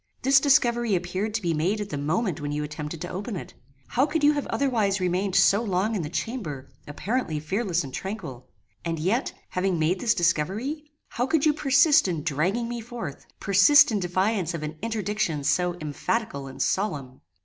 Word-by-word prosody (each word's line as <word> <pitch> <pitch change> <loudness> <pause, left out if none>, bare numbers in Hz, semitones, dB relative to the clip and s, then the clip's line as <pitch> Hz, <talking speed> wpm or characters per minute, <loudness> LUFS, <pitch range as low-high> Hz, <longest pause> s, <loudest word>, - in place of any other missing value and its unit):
This 270 +1 +6
discovery 240 -6 +3
appeared 185 +4 -2
to 225 - -2
be 170 -1 +1
made 175 +8 0
at 205 -1 -5
the - - -2
moment 160 +3 -1
when 145 0 -3
you 150 0 -2
attempted 150 +1 -6
to 175 - -4
open 200 +4 -5
it. 175 - -7 0.4
How 265 +4 +2
could 310 0 -1
you 295 - +7
have 290 -1 -2
otherwise 220 -8 +1
remained 185 +1 0
so 200 +3 +5
long 205 0 0
in 205 - -1
the 150 - -4
chamber 165 - -4 0.2
apparently 170 - -2
fearless 180 +2 -1
and 135 -2 -9
tranquil? 165 - -6 0.3
And 165 -1 -2
yet, 195 - 0 0.2
having 185 -1 0
made 165 +4 +1
this 230 +1 +2
discovery, 195 - 0 0.2
how 245 +2 -1
could 320 0 +2
you 305 - +4
persist 290 0 +4
in 165 -5 -2
dragging 175 - 0
me 240 0 -4
forth: 225 - -7
persist 200 - +6
in 210 - 0
defiance 185 0 0
of 155 - -5
an 155 +1 -6
interdiction 210 -8 -2
so 175 +4 +1
emphatical 155 +1 -3
and 135 - -3
solemn? 145 -10 -2
190 Hz, 185 wpm, -25 LUFS, 160-235 Hz, 0.4 s, you